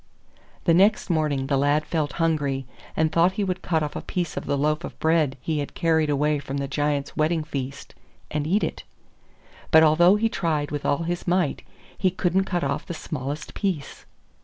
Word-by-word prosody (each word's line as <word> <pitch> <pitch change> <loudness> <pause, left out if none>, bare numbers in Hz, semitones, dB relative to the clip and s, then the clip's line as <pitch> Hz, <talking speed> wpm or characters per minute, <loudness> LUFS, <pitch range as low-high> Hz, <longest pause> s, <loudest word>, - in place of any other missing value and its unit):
The 170 - +4
next 195 +2 +3
morning 150 -4 +1
the 140 0 +1
lad 145 +2 +2
felt 150 -5 -1
hungry, 145 -5 0 0.3
and 155 0 +2
thought 170 +3 +3
he 205 - -1
would 185 -1 -2
cut 160 -3 0
off 150 - -4
a - - -3
piece 175 -3 -3
of - - -5
the 145 - +1
loaf 150 +2 +1 0.6
he 155 -2 -1
had 145 - -5
carried 160 -3 +2
away 150 +1 +1
from 140 0 -5
the 140 0 -2
Giants' 145 0 -1
wedding 155 +1 +1
feast, 135 -2 -6 0.4
and 150 0 -1
eat 200 +6 +2
it. - - -3 0.9
But 160 -2 +7
although 170 +5 +6
he 220 +2 +2
tried 160 -9 -1
with 145 -1 -3
all 145 +4 +1
his 175 +2 -3
might, 175 -4 +1 0.3
he 190 - +2
couldn't 185 +1 +1
cut 175 -2 -1
off - - -2
the 175 - -4
smallest 150 0 -5
piece. 180 -9 -3
155 Hz, 185 wpm, -24 LUFS, 145-175 Hz, 0.9 s, But